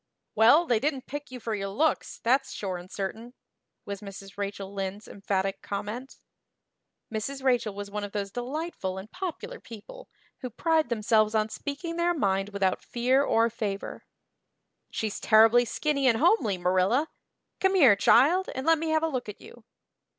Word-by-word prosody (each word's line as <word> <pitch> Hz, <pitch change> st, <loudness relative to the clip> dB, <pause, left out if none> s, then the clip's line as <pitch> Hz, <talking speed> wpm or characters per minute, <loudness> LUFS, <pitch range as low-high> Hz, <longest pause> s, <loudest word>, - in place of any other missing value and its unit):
"Well, 240 Hz, +10 st, +6 dB
they 240 Hz, -7 st, +2 dB
didn't 275 Hz, 0 st, -2 dB
pick 290 Hz, +1 st, -7 dB
you 255 Hz, -1 st, -8 dB
for 225 Hz, -1 st, -4 dB
your 195 Hz, -2 st, -3 dB
looks, 300 Hz, +11 st, 0 dB
that's 265 Hz, +3 st, +2 dB
sure 190 Hz, -3 st, -4 dB
and 175 Hz, +1 st, -11 dB
certain," 220 Hz, +6 st, -6 dB, 0.5 s
was 200 Hz, -1 st, -6 dB
Mrs. 195 Hz, -1 st, -10 dB
Rachel 200 Hz, -1 st, -5 dB
Lynde's 195 Hz, +1 st, -5 dB
emphatic 195 Hz, -1 st, -2 dB
comment. 210 Hz, +6 st, -5 dB, 1.0 s
Mrs. 265 Hz, +5 st, -4 dB
Rachel 245 Hz, -6 st, +1 dB
was 200 Hz, 0 st, -7 dB
one 210 Hz, 0 st, -4 dB
of 205 Hz, -, -5 dB
those 200 Hz, -1 st, -3 dB
delightful 245 Hz, -, -4 dB
and 195 Hz, +3 st, -9 dB
popular 375 Hz, +6 st, -6 dB
people 235 Hz, -, -12 dB, 0.3 s
who 255 Hz, -, -5 dB
pride 315 Hz, +4 st, +1 dB
themselves 215 Hz, -1 st, +2 dB
on 215 Hz, 0 st, +1 dB
speaking 315 Hz, +8 st, -5 dB
their 345 Hz, 0 st, +1 dB
mind 195 Hz, -6 st, 0 dB
without 200 Hz, -2 st, 0 dB
fear 250 Hz, +3 st, +1 dB
or 230 Hz, -4 st, +3 dB
favor. 205 Hz, -3 st, -4 dB, 0.9 s
"She's 215 Hz, -2 st, -3 dB
terrible 225 Hz, +2 st, +6 dB
skinny 280 Hz, +1 st, 0 dB
and 230 Hz, -3 st, +4 dB
homely, 285 Hz, -, +3 dB
Marilla. 185 Hz, -, +2 dB, 0.5 s
Come 385 Hz, 0 st, +2 dB
here, 265 Hz, -, +7 dB
child, 340 Hz, -, +4 dB
and 260 Hz, +1 st, -4 dB
let 325 Hz, -1 st, +4 dB
me 325 Hz, 0 st, -2 dB
have 315 Hz, 0 st, +2 dB
a -, -, +2 dB
look 255 Hz, -8 st, -4 dB
at 210 Hz, -, -9 dB
you. 240 Hz, -2 st, -15 dB
225 Hz, 165 wpm, -27 LUFS, 200-285 Hz, 1.0 s, here